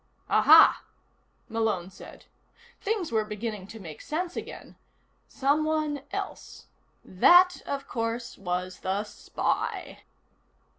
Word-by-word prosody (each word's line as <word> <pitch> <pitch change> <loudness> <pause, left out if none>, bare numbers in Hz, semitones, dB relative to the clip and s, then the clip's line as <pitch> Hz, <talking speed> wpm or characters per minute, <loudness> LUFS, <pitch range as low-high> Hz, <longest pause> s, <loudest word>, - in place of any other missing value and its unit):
"Aha," - - +7 0.6
Malone 220 -6 -1
said. - - -13 0.6
Things 400 - -2
were 220 -1 +1
beginning 210 -2 -5
to 225 +2 -10
make 160 -6 -10
sense 345 +3 -4
again. - - -8 0.5
Someone 300 +1 0
else. - - -6 0.4
That, 355 - +5
of 275 0 -4
course, 230 +1 -3
was 180 -1 -4
the 195 +2 -1
spy. 210 - -3
230 Hz, 100 wpm, -27 LUFS, 195-305 Hz, 0.6 s, Aha